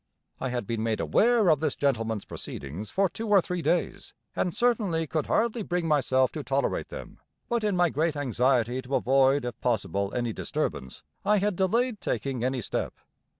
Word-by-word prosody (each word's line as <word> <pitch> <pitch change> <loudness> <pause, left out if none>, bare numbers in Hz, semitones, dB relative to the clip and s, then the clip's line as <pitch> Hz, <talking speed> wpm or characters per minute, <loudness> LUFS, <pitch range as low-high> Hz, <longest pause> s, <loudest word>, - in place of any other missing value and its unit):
I 130 - -2
had 120 -3 -2
been 115 +1 -2
made 110 -1 0
aware 230 -3 +3
of 155 -3 +4
this 155 - 0
Gentleman's 115 -6 0
proceedings 80 +10 -6
for 195 +1 +2
two 220 +6 -6
or 205 -1 +7
three 180 0 -2
days, 175 +1 -1 0.2
and 180 - 0
certainly 205 -7 +1
could 155 0 -2
hardly 230 +1 +1
bring 175 -4 -1
myself 130 -3 +2
to 150 - -5
tolerate 140 0 -1
them, - - -9 0.3
but 235 -2 0
in 210 -2 +1
my 175 -2 +3
great 160 0 0
anxiety 125 -2 +1
to 130 +2 -3
avoid 135 +1 +3
if 120 - -6
possible 100 -4 0
any 120 -2 -1
disturbance, 65 - -4 0.2
I 210 +1 +3
had 205 0 +1
delayed 220 +5 +1
taking 130 -4 -2
any 130 -2 -1
step. - - -3
145 Hz, 180 wpm, -27 LUFS, 125-190 Hz, 0.3 s, or